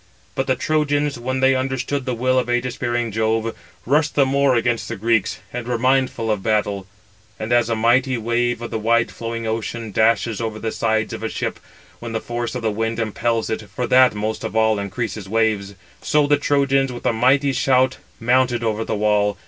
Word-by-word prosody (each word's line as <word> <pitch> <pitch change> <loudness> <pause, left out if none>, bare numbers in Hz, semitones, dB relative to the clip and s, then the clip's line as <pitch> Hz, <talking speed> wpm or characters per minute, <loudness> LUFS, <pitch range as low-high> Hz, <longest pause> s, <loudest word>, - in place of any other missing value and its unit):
But 135 - -2
the 130 - +2
Trojans, 145 -1 0
when 130 +2 -2
they 130 0 +5
understood 130 +1 -2
the 125 - -1
will 130 +2 +2
of 125 - -2
ægis 120 +1 -1
bearing 120 -1 -1
Jove, 110 +1 0 0.3
rushed 150 +4 +2
the 140 - +4
more 135 0 +2
against 120 0 0
the - - -4
Greeks, 110 0 +1 0.2
and 120 -1 -5
were 120 -1 0
mindful 130 -2 +1
of 105 -2 -1
battle. 100 -2 0 0.5
And 110 +2 -2
as 120 -1 +3
a 115 - +1
mighty 125 +3 +2
wave 120 +1 -1
of 120 - -6
the 110 - -2
wide 115 +1 +2
flowing 115 0 -5
ocean 110 0 -3
dashes 110 +1 +2
over 110 -1 -3
the 110 0 -3
sides 110 -1 0
of - - -6
a - - -2
ship, - - -3 0.4
when 115 -1 -6
the 115 - -1
force 120 +1 -4
of 125 - -4
the 110 - +1
wind 115 +2 -2
impels 115 +1 -1
it 110 - -2
(for 125 +5 -3
that 125 -1 +5
most 110 +1 -3
of - - -5
all 110 -1 +3
increases 100 -1 -4
waves); 105 -2 0 0.3
so 150 -1 +2
the 145 +1 +4
Trojans 135 -2 +1
with 120 - -8
a - - +2
mighty 135 +4 +3
shout 130 0 +2 0.2
mounted 120 0 +2
over 110 -1 -1
the 110 - -2
wall. 105 -1 +1
120 Hz, 205 wpm, -21 LUFS, 110-130 Hz, 0.5 s, they